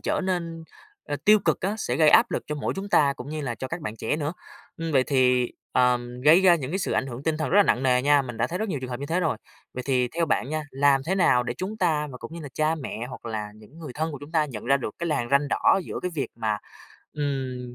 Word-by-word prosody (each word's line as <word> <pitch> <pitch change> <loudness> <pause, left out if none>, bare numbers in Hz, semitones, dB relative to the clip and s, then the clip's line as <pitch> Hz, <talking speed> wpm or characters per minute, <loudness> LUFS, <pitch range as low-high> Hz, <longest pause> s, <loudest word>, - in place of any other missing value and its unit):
trở - - -1
nên, 170 -3 -3 0.4
ơ, 145 - -3
tiêu 215 +1 +7
cực 160 -3 +1
á, 200 +3 -1
sẽ 125 -9 -1
gây 155 -1 +5
áp 230 +7 +6
lực - - -2
cho 150 - -3
mỗi 145 - -2
chúng 195 +1 -5
ta 145 -8 +4
cũng 125 +3 -8
như 155 0 -4
là 125 -5 -3
cho 130 - -6
các 165 +1 -4
bạn 110 -5 -5
trẻ 115 +7 -1
nữa. 150 0 -2 0.4
Ưm, 165 -1 -4
vậy 130 -2 +4
thì, 125 -3 +2 0.2
ờm, 125 -1 +1
gây 155 +7 +6
ra 180 -2 +6
những 135 -5 -4
cái 190 - -1
sự - - -2
ảnh 135 - 0
hưởng 125 +1 -7
tinh 160 0 0
thần 155 - -2
rất 195 - +3
là 205 - +8
nặng 130 - +1
nề 125 -1 +3
nha, 145 0 +4
mình 120 -3 -7
đã 115 - +1
thấy 175 - -4
rất 220 0 -2
nhiều 150 -7 -2
trường 130 -1 -6
hợp 125 - -5
như 140 - -4
thế 170 +4 0
rồi. 160 -9 0 0.4
Vậy 125 - -4
thì 125 -2 +2
theo 165 +3 -1
bạn 140 -3 0
nha, 155 0 -1
làm 135 0 +3
thế 190 - +1
nào 170 -10 +4
để 125 - -4
chúng 195 +4 -4
ta, 160 -6 +1
mà 125 - -9
cũng - - -9
như 170 - -7
là 145 - -7
cha 155 +1 +1
mẹ 125 -6 -5
hoặc 120 - -9
là 105 -2 -4
những 110 +9 -16
người 155 -6 -8
thân 160 +1 -2
của 145 - -6
chúng 145 +3 -11
ta 155 -2 +3
nhận 120 -8 -7
ra 135 +3 +4
được 125 -6 -5
cái 170 - -3
làn 120 -7 -1
ranh 140 +1 +3
đỏ 195 - +3
giữa - - -5
cái 180 - -2
việc 140 -4 -2
mà, 110 -2 -1 0.5
ừm, 130 -4 -3
145 Hz, 295 wpm, -25 LUFS, 125-165 Hz, 0.5 s, là